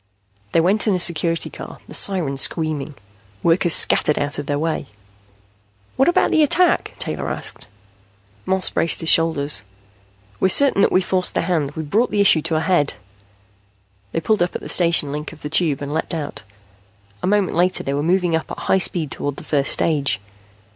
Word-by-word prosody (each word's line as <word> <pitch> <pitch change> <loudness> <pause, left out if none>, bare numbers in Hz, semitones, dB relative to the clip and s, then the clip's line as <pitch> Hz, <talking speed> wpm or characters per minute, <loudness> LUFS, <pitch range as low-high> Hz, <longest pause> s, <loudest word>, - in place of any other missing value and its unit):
They - - +3
went 195 +6 +2
in 205 - +2
a - - -1
Security 170 -1 0
Car, - - -10
the - - -11
siren 175 -9 +1
screaming. 150 0 +1 0.5
Workers 170 0 +2
scattered 150 - +3
out 145 0 -2
of 145 - -6
their 145 - -1
way. 155 -2 -3 1.1
"What 270 - +2
about 350 +1 +2
the 315 - +3
attack?" 340 +4 +2
Taylor - - -4
asked. - - -6 0.8
Moss 190 0 +2
braced 165 - +1
his 165 - 0
shoulders. 150 -6 +2 0.8
"We're 190 - +2
certain 270 -1 +3
that - - +3
we've 185 -1 +2
forced 185 -1 +1
their - - 0
hand. 160 -5 -1
We've 160 -1 -6
brought 225 +11 +1
the 210 - -2
issue 190 -5 +5
to 165 +1 -2
a 155 - +1
head." 160 -3 +1 1.2
They - - -1
pulled 210 +4 0
up 175 - -1
at - - -4
the - - -8
station 170 -5 +2
link 150 +2 -6
of 155 - -17
the 150 - -6
Tube 155 -4 0
and 140 +1 -5
leaped 160 +1 -3
out. 150 -3 -5 0.8
A - - -2
moment 205 -1 +1
later 180 +2 +1
they 140 - -3
were 145 - -1
moving 175 +1 +1
up 160 - -3
at - - -7
high 190 - +1
speed 165 -5 +1
toward 145 -1 -4
the - - -10
first 140 -2 0
stage. 145 -7 0
165 Hz, 190 wpm, -20 LUFS, 150-185 Hz, 1.2 s, issue